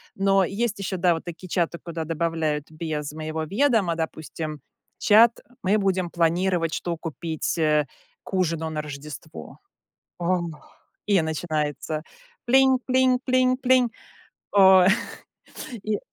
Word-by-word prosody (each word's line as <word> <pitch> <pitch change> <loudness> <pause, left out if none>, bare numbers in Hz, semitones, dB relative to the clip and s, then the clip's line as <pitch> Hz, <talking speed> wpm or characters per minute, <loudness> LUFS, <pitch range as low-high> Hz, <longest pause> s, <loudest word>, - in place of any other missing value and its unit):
Но 195 0 +3
есть 205 +2 -2
ещё, 190 -1 -3
да, 175 -1 +3
вот 165 - -5
такие 175 +1 -8
чаты, 170 -1 -1
куда 170 -1 -4
добавляют 160 -2 -1
без 155 -2 -4
моего 155 0 -4
ведома, 205 - +2
допустим, 160 -2 -5 0.4
чат: 225 +2 +5 0.2
"Мы 200 +3 +3
будем 190 -3 0
планировать, 170 0 +1
что 170 -2 -3
купить, 165 0 -4
э, 150 -2 +2 0.4
к - - -12
ужину 165 -3 0
на 155 -1 -3
Рождество". 150 +1 -9 0.6
О, 180 +1 +1 0.7
и 200 -5 +3
начинается: 155 -1 -2 0.4
"Плинь, 265 +1 +5
плинь, 255 -1 +3
плинь, 255 0 +3
плинь". 255 -2 +3 0.6
О, 190 -2 +7 1.0
и 215 -1 0
170 Hz, 125 wpm, -24 LUFS, 160-200 Hz, 1.0 s, О